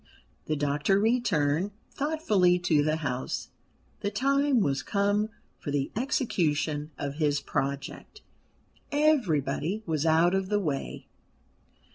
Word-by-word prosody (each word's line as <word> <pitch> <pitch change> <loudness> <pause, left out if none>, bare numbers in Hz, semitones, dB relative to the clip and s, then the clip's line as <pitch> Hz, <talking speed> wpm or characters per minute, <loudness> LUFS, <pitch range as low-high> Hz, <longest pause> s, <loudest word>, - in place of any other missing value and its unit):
The 155 - -1
doctor 145 +6 +1
returned 200 -7 +1 0.2
thoughtfully 220 - +2
to 175 -4 +2
the 155 +1 +1
house. 130 -5 -3 0.5
The 200 - -1
time 275 +4 +2
was 140 -8 +1
come 205 +1 +1 0.3
for - - -6
the 140 -1 -1
execution 160 - 0
of 140 0 -4
his 150 -2 +2
project. 140 - -4 0.7
Everybody 205 - +1
was 160 -1 0
out 165 +3 +4
of 190 0 0
the 205 0 +2
way. 150 -8 -3
175 Hz, 115 wpm, -28 LUFS, 145-215 Hz, 0.7 s, out